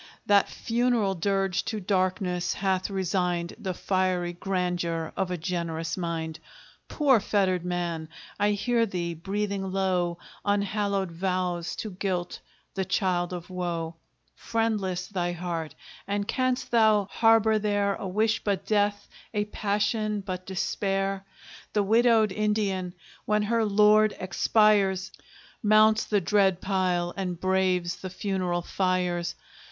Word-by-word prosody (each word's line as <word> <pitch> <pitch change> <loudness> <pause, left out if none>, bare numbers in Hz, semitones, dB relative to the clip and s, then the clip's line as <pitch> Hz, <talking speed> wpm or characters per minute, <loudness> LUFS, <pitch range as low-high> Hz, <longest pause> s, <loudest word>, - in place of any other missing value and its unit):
That 200 -1 +4
funeral 235 -4 +1
dirge 195 0 0
to 215 - -3
darkness 185 -2 0
hath 190 -1 0
resigned 180 -3 -1
The 190 -4 -3
fiery 185 -2 0
grandeur 175 -3 -2
of 190 -1 -1
a 180 - -2
generous 165 -1 -3
mind. 165 -3 -3 0.5
Poor 275 -6 +3
fettered 190 -3 +1
man! 175 -3 -3 0.3
I 205 0 +3
hear 230 +3 +1
thee 175 -3 -3
breathing 195 +2 -3
low 180 -3 0 0.3
Unhallowed 200 -2 0
vows 180 -1 -2
to 215 - -5
Guilt, 180 -2 -3 0.3
the 190 - -1
child 185 -2 0
of 180 0 -7
Woe: 170 -2 -3 0.4
Friendless 210 -6 -1
thy 175 -3 -2
heart; 170 -2 -4 0.3
and 200 0 -1
canst 255 -1 -1
thou 220 -3 +4
harbor 225 -1 +4
there 205 -1 +1
A 195 - -5
wish 215 +4 +1
but 200 -3 -1
death 205 -1 +1 0.3
a 210 0 +1
passion 210 +1 -1
but 185 -1 -6
despair? 195 +1 -1 0.5
The 210 - +2
widowed 225 0 +4
Indian, 200 -4 -1 0.3
when 210 0 +2
her 230 +2 +1
lord 210 +1 +4
expires, 190 0 +2 0.5
Mounts 215 0 +5
the 210 - +2
dread 190 0 +3
pile, 185 -3 0
and 180 -3 -3
braves 185 -2 +1
the 185 - -6
funeral 185 -2 -2
fires. 180 -2 -1
190 Hz, 125 wpm, -27 LUFS, 180-210 Hz, 0.5 s, Mounts